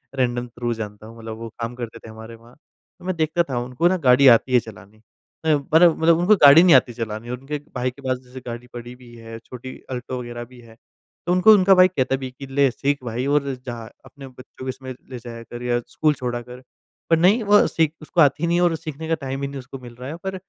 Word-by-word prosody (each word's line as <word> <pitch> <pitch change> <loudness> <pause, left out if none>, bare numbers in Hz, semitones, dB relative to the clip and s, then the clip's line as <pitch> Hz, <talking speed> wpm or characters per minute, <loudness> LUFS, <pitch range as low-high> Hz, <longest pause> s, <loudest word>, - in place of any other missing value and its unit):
Random 125 -2 -1
through 120 0 -4
जानता 105 -1 -8
हूँ, 115 +1 -13
मतलब 110 -1 -8
वो 115 0 -7
काम 115 +1 -4
करते 115 -2 -7
थे 115 - -13
हमारे 110 +1 -11
वहाँ। 115 +2 -19
तो 160 - -24
मैं 185 -1 -2
देखता 160 +1 +1
था 125 -2 -1
उनको 125 +7 0
ना 185 +1 +2
गाड़ी 130 +2 +6
आती 125 +1 +5
है 125 - +6
चलानी, 110 -2 -13 0.5
म 160 - +4 0.2
मतलब 165 0 +6
मतलब 165 0 +5
उनको 190 +5 +5
गाड़ी 145 +3 +9
नहीं 180 -5 +7
आती 125 -1 +3
चलानी 115 0 -6
और 125 - -3
उनके 145 +3 -5 0.2
भाई 125 0 -1
के 140 - -17
पास 130 -1 -1
जैसे 125 +1 -11
गाड़ी 120 +1 -7
पड़ी 120 0 -8
भी 125 -1 -16
है, 115 0 -10
छोटी 125 +2 -10 0.2
अल्टो 125 0 -5
वगैरह 120 -1 -7
भी 125 +1 -17
है, 115 -1 -17 0.5
तो 175 - 0
उनको 185 +4 +6
उनका 195 -1 +5
भाई 185 0 +7
कहता 135 -7 -1
भी 130 -1 -6
कि 135 +2 -10
ले 135 0 +2
सीख 140 +2 -2
भाई 120 +1 -3
और 145 0 +2 0.2
जा 120 -2 -6 0.3
अपने 140 -1 -12
बच्चों 130 0 -13
को - - -3
इसमें 130 0 -7 0.2
ले 125 -2 -7
जाया 115 0 -9
कर 120 +1 -9
या 120 0 0
स्कूल 155 -1 +1
छोड़ा 125 -3 -4
कर, 125 +1 -12 0.5
पर 165 - +4
नहीं 190 +8 +4
वो 205 0 +5
सीख 160 -2 0
उसको 165 +2 0
आती 150 +3 +3
नहीं 170 +1 +1
है 175 - +2
और 170 -2 +2
सीखने 160 -1 -7
का 165 - +1
टाइम 135 0 -4
ही 140 - -2
नहीं 140 0 -7
उसको 135 +1 -10
मिल 120 -2 -12
रहा 125 +2 -8
है 155 - -5
पर 190 0 -3
130 Hz, 250 wpm, -22 LUFS, 120-155 Hz, 0.5 s, गाड़ी